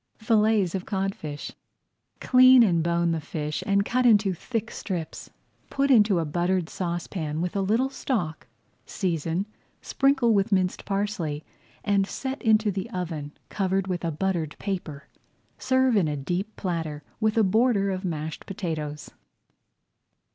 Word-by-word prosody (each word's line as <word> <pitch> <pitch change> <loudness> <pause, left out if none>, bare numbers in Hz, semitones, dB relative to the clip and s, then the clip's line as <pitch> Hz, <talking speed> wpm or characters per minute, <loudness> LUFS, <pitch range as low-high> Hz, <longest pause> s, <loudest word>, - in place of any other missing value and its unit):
FILLETS 215 -4 +2
OF 190 -1 -4
CODFISH 195 -7 -3 0.7
Clean 255 -1 +7
and 175 -6 +2
bone 170 0 +1
the 165 -1 -1
fish 150 0 -4
and 200 0 +2
cut 255 +3 +1
into 210 -5 +4
thick 225 +5 -4
strips. 175 -6 -5 0.4
Put 275 0 +1
into 210 -6 +5
a 165 - 0
buttered 175 +2 0
saucepan 170 -3 -3
with 180 +2 -2
a 200 - +1
little 230 +7 +1
stock, 175 - -3 0.4
season, 170 0 -1 0.3
sprinkle 270 -4 +2
with 200 0 +1
minced 185 -2 0
parsley, 195 -7 -2 0.4
and 200 -1 +2
set 265 +4 -5
into 215 -2 +3
the 190 -1 -4
oven, 160 -5 -5 0.2
covered 195 -1 0
with 180 -2 -3
a 170 - 0
buttered 165 -1 -2
paper. 175 -8 -5 0.5
Serve 260 -1 +2
in 190 -6 +3
a 150 -1 -2
deep 180 +10 -3
platter 160 -5 -3 0.2
with 220 0 +1
a 225 - +5
border 205 0 +2
of 185 0 -4
mashed 160 -3 -4
potatoes. 155 -6 -5
190 Hz, 140 wpm, -26 LUFS, 165-215 Hz, 0.7 s, Clean